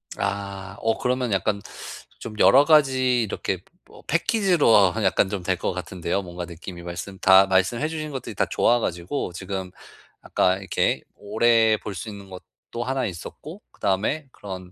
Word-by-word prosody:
아, 100 -1 -4
어 115 0 0
그러면 125 -2 -1
약간 100 +1 0 0.6
좀 110 - -7
여러 135 +3 +7
가지 130 -5 +4
이렇게 95 -2 -3 0.3
뭐 - - -17
패키지로 175 - +3 0.2
하면 110 +1 -3
약간 95 +1 +2
좀 100 -3 -4
될 95 +1 0
것 95 - -2
같은데요. 90 +1 -3
뭔가 90 -1 -7
느낌이 85 +1 -9
말씀 90 +3 -7
다 95 +1 +7
말씀해 95 +10 +1
주신 155 -2 -5
것들이 135 - -6
다 - - +1
좋아 120 +1 +3
가지고 90 +1 -3
지금 95 0 -5 0.5
아까 95 0 +1
이렇게 95 -2 0
오래 110 +1 +3
볼 105 -1 -7
수 100 +5 -6
있는 100 -2 -10
것도 95 +5 -9
하나 130 +1 -1
있었고, 145 - -8
그다음에 110 +10 -1
그런 95 -4 -9
100 Hz, 320 characters per minute, -24 LUFS, 95-125 Hz, 0.6 s, 여러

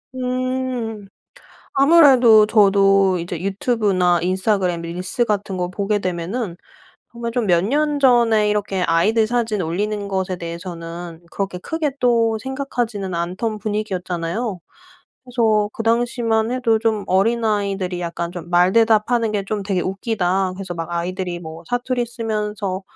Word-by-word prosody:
음. 255 -4 -3 0.7
아무래도 270 -7 +6
저도 195 -3 +4
이제 170 0 -5
유튜브나 195 -3 +1
인스타그램 185 -1 0
릴스 180 +8 -2
같은 200 -3 -2
거 180 0 -2
보게 205 +2 -1
되면은 180 +2 -3 0.6
정말 235 -1 -5
좀 235 -2 -1
몇 175 -3 +3
년 295 +5 0
전에 235 -5 +4
이렇게 200 -3 -1
아이들 215 +7 +2
사진 225 -4 -1
올리는 200 +5 -2
것에 190 -2 -2
대해서는 170 0 -7
그렇게 195 -2 -3
크게 315 - -2
또 230 -2 +2
생각하지는 240 -8 -3
않던 185 +6 -3
분위기였잖아요. 195 -1 -3 0.7
그래서 220 -4 +1
그 225 - -5
당시만 230 -1 +1
해도 245 -3 +1
좀 220 -2 0
어린아이들이 200 -3 0
약간 170 0 -4
좀 175 -1 -8
말대답하는 220 +5 +3
게 200 -2 -1
좀 205 0 -3
되게 195 -2 -1
웃기다. 190 -2 -1
그래서 185 -2 -6
막 165 0 -5
아이들이 175 +1 -3
뭐 160 0 -9
사투리 245 0 -1
쓰면서 210 -5 -3
205 Hz, 310 characters per minute, -20 LUFS, 180-230 Hz, 0.7 s, 아무래도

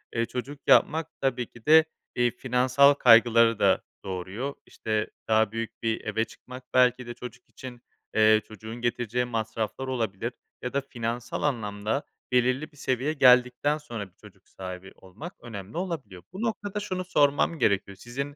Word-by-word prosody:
eee, 115 - +1
çocuk 130 +4 -6
yapmak 160 0 +4
tabii 125 -3 0
ki 120 -2 -18
de, 160 +1 +7 0.3
iii, 120 -1 +2
finansal 130 +3 +4
kaygıları 115 -3 +5
da 95 -1 +3 0.2
doğuruyor, 95 +9 -4
işte, 110 -1 -2 0.2
daha 110 -1 +3
büyük 115 0 -6
bir 110 -1 0
eve 110 +1 0
çıkmak 125 +2 -12
belki 125 -1 +3
de 120 - -5
çocuk 125 +1 -11
için, 125 -2 -10 0.3
eee, 110 0 +5
çocuğun 110 +1 -9
getireceği 120 0 -1
masraflar 115 +2 -3
olabilir 115 -2 -2 0.3
ya 125 - -4
da 140 - +1
finansal 120 -2 -4
anlamda 110 -2 -1 0.3
belirli 130 +5 +1
bir 145 - -22
seviyeye 130 +3 -1
geldikten 125 +2 +4
sonra 115 -9 -7
bir - - -37
çocuk - - -18
sahibi 95 0 -8
olmak 110 - -10
önemli 110 - -8
olabiliyor. 135 - -5
Bu 195 - -6
noktada 210 -3 -2
şunu 185 -3 -4
sormam 150 -1 +2
gerekiyor, 100 -1 +1
sizin 140 +7 -6
120 Hz, 155 wpm, -27 LUFS, 110-140 Hz, 0.3 s, de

